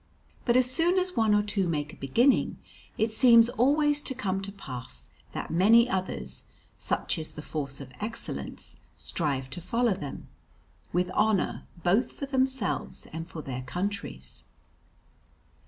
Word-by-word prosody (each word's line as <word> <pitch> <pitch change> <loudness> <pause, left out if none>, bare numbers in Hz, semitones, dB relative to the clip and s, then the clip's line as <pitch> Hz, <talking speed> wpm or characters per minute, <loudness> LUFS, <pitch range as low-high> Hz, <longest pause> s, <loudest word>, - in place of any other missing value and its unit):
But 240 -1 +4
as 255 - +6
soon 335 +8 +3
as 370 0 +1
one 220 -3 +4
or 205 - +3
two 205 -3 0
make 150 -1 -2
a - - -10
beginning, 235 - +2 0.4
it 220 +1 +1
seems 230 0 +7
always 290 +5 +3
to 265 - -4
come 195 -6 -1
to 195 +1 -5
pass 120 - -8 0.2
that - - -4
many 220 +8 +6
others 65 - -3 0.3
such - - -1
is 160 - -7
the 150 - -7
force 140 -4 -4
of 135 -2 -9
excellence 230 +3 -6 0.2
strive 135 -5 -2
to 175 - -6
follow 230 +5 +1
them, 145 -6 -7 0.6
with 180 +1 +1
honour 210 -1 +1 0.2
both 195 +7 +2
for 280 - -5
themselves 265 -5 -1
and 165 +1 -5
for 160 -3 -7
their 130 -2 -4
countries. 150 - -4
200 Hz, 150 wpm, -28 LUFS, 150-240 Hz, 0.6 s, seems